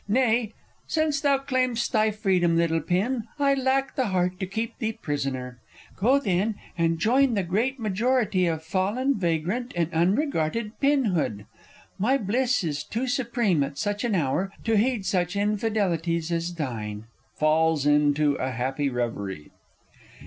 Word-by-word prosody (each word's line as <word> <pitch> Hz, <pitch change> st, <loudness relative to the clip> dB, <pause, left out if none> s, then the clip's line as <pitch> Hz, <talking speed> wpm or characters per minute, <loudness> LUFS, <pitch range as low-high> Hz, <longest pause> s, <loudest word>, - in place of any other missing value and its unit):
Nay, 230 Hz, -1 st, +2 dB, 0.3 s
since 310 Hz, -3 st, 0 dB
thou 280 Hz, -2 st, +3 dB
claim'st 255 Hz, -3 st, -1 dB
thy 220 Hz, -1 st, +3 dB
freedom, 190 Hz, -5 st, +1 dB
little 165 Hz, -1 st, +2 dB
pin, 215 Hz, -, 0 dB
I 280 Hz, -1 st, +3 dB
lack 270 Hz, 0 st, 0 dB
the 260 Hz, -3 st, +1 dB
heart 180 Hz, -1 st, 0 dB
to 190 Hz, -, -2 dB
keep 220 Hz, +4 st, -4 dB
thee 225 Hz, -2 st, -1 dB
prisoner. 130 Hz, -, -4 dB, 0.4 s
Go, 250 Hz, +8 st, +3 dB
then, 205 Hz, -2 st, 0 dB, 0.2 s
and 165 Hz, -1 st, +1 dB
join 245 Hz, +7 st, +3 dB
the 200 Hz, -, +1 dB
great 230 Hz, +10 st, -1 dB
majority 215 Hz, -2 st, +1 dB
Of 160 Hz, -1 st, -2 dB
fallen, 205 Hz, +11 st, 0 dB
vagrant, 180 Hz, +8 st, -1 dB
unregarded 175 Hz, -, 0 dB
pinhood 200 Hz, -, +1 dB, 0.5 s
My 250 Hz, +8 st, +3 dB
bliss 245 Hz, +1 st, 0 dB
is 150 Hz, -3 st, -2 dB
too 225 Hz, +12 st, -3 dB
supreme 240 Hz, -, +1 dB
at 140 Hz, 0 st, -3 dB
such 205 Hz, +1 st, -2 dB
an 235 Hz, -4 st, +1 dB
hour 170 Hz, +4 st, 0 dB
To 225 Hz, 0 st, +1 dB
heed 220 Hz, -1 st, +1 dB
such 180 Hz, -1 st, 0 dB
infidelities 195 Hz, -6 st, 0 dB
as 170 Hz, +1 st, -2 dB
thine. 110 Hz, -8 st, -4 dB, 0.3 s
[_Falls 155 Hz, -1 st, +2 dB
into 145 Hz, 0 st, +3 dB
a 130 Hz, -, -2 dB
happy 130 Hz, +4 st, -1 dB
reverie. 100 Hz, -, -4 dB
195 Hz, 140 wpm, -25 LUFS, 160-240 Hz, 0.5 s, thou